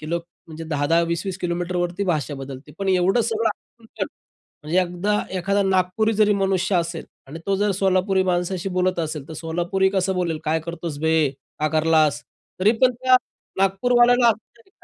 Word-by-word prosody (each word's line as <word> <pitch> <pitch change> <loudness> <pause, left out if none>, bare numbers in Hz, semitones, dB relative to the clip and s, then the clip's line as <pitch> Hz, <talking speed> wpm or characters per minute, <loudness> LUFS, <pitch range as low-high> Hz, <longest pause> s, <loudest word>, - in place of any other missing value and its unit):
की 155 - -8
लोक 170 0 -2 0.2
म्हणजे 160 0 -8
10-10, 155 +1 +1
20-20 170 +3 -3
किलोमीटरवरती 175 +1 -2
भाषा 150 -2 -1
बदलते. 135 +1 -9
पण 195 -1 -2
एवढं 190 +5 +3
सगळं 225 0 0 0.3
आमच्या, 225 - -5 0.6
म्हणजे 165 +5 +1
एकदा 180 +4 -1 0.2
एखादा 200 +3 +1
नागपुरी 190 +4 +1
जरी 210 0 +3
मनुष्य 190 0 +1
असेल 170 -1 -2 0.2
आणि 160 +4 -8
तो 195 - +2
जर 205 +1 +1
सोलापुरी 190 0 +2
माणसाशी 180 +1 -2
बोलत 180 -1 +1
असेल. 155 -3 -4
तर - - -8
सोलापुरी 175 +4 0
कसं 190 -1 0
बोलेल, 170 -3 -1
"काय 160 +1 +1
करतोस 170 -3 -5
बे, 160 -3 +3 0.3
का 155 - +2
करलास." 155 -5 +3 0.4
तरी 205 +3 +5
पण 255 -1 +5
त्या 255 +1 +3 0.4
नागपूरवाल्याला 240 +4 +4 0.2
कळतं, 235 +11 -24
180 Hz, 160 wpm, -22 LUFS, 165-195 Hz, 0.6 s, तरी